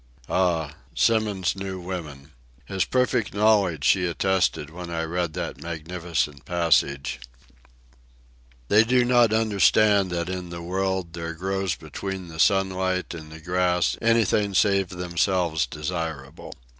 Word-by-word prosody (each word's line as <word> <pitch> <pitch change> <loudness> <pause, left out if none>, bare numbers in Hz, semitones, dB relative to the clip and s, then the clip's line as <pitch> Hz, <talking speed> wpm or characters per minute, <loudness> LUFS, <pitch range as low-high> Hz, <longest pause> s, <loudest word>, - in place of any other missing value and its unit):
Ah, 85 -5 +1 0.2
Symons 105 -6 +1
knew 95 -1 -5
women! 80 -6 -7 0.3
His 95 +4 -1
perfect 125 -4 0
knowledge 100 -8 +3
she 90 -2 +3
attested 90 -4 0
when 85 +1 -8
I 85 -1 -2
read 85 0 -2
that - - -5
magnificent 80 -3 -3
passage: 80 -5 +1 1.5
"They 105 +2 +6
do 125 +1 +3
not 120 -2 +4
understand 105 -2 +3
that 85 -1 -2
in 90 -1 -5
the 85 0 -7
world 95 -1 -2
There 85 -1 -5
grows 95 0 -2
between 90 +4 -6
the 80 -1 -10
sunlight 95 -1 +1
and 80 -2 -9
the 80 - -10
grass 90 +1 +1
Anything 110 -3 +2
save 100 -1 +3
themselves 90 -2 0
desirable. 80 -4 -5
90 Hz, 125 wpm, -24 LUFS, 85-95 Hz, 1.5 s, They